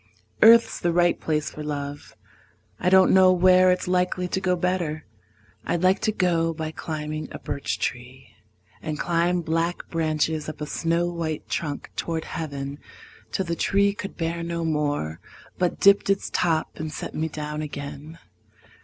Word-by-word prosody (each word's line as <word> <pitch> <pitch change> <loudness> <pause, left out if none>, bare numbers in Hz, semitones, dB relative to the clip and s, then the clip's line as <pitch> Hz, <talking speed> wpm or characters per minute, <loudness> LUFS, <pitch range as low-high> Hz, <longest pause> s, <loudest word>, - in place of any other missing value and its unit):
Earth's 230 +1 +7
the 175 - +1
right 175 0 +3
place 150 -2 -1
for 155 - -8
love: 145 -1 -5 0.6
I 180 - +2
don't 190 0 +6
know 185 -1 +7
where 185 0 +5
it's 180 0 -1
likely 180 0 0
to 190 - -1
go 185 -1 +2
better. 175 -4 -2 0.6
I'd 175 - -1
like 185 +1 +4
to 220 - +1
go 165 -4 +1
by 155 0 -4
climbing 155 -1 -5
a - - -6
birch 140 - -3
tree, 125 +2 -5 0.5
And 155 -1 -4
climb 175 +1 +1
black 165 +1 -1
branches 155 -1 0
up 155 - -8
a 150 - -3
snow 165 +3 0
white 165 -3 -4
trunk 145 -3 -3
Toward 165 -1 -3
heaven, 140 -3 -5 0.5
till 190 - -1
the 170 -1 -2
tree 200 +3 +2
could 200 -2 -7
bear 170 0 -2
no 170 0 -3
more, 145 - -1 0.4
But 180 -1 0
dipped 200 0 +5
its 195 0 0
top 165 -2 0
and 155 0 -4
set - - -6
me 160 - -1
down 150 0 -5
again. 145 +1 -7
165 Hz, 160 wpm, -24 LUFS, 150-180 Hz, 0.6 s, Earth's